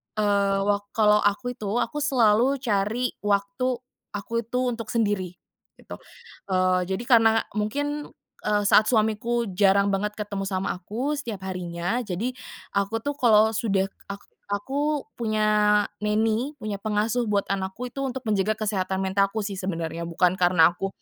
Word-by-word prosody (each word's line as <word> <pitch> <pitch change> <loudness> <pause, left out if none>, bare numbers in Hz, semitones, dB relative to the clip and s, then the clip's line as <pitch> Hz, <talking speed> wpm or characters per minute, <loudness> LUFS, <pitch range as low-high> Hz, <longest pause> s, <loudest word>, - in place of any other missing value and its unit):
eee, 200 -2 +2
wa 205 0 +2 0.2
kalau 210 -1 +5
aku 210 +5 0
itu 215 -4 -7 0.2
aku 295 - -5
selalu 250 -2 +3
cari 220 +3 0
waktu 205 +5 0 0.4
aku 230 +3 -2
itu 235 +2 -3
untuk 230 -2 -6
sendiri, 205 -6 -1 0.4
gitu, - - -11 0.5
eee. 185 -1 +2
Jadi, 190 +5 -2
karena 225 -2 +4 0.2
mungkin, 290 +7 -2 0.4
eee, 210 -1 +2
saat 210 +1 +5
suamiku 225 0 +1
jarang 200 +1 +3
banget 210 +2 -1
ketemu 200 -2 -4
sama 190 -1 -1
aku 235 - -3
setiap 220 -8 -6
harinya. 180 +4 -2
Jadi, 200 +8 -2 0.4
aku 200 +3 -1
tuh, 290 0 -2
kalau 220 -2 +5
sudah, 210 -3 +1
eee, - - -27
ak 200 - -18 0.2
aku 275 +8 -1 0.2
punya 215 -2 0 0.6
nanny, 220 +6 0
punya 210 -6 -5
pengasuh 215 +3 0
buat 205 -1 +1
anakku 195 +6 -3
itu - - -7
untuk 265 -1 -3
menjaga 215 -1 +1
kesehatan 195 -3 -1
mentalku 195 +3 +1
sih, 200 -2 -4
sebenarnya. 170 -2 -3
Bukan, 180 +2 +1
karena 175 -2 +5
aku 185 +3 -4
210 Hz, 150 wpm, -25 LUFS, 195-230 Hz, 0.6 s, kalau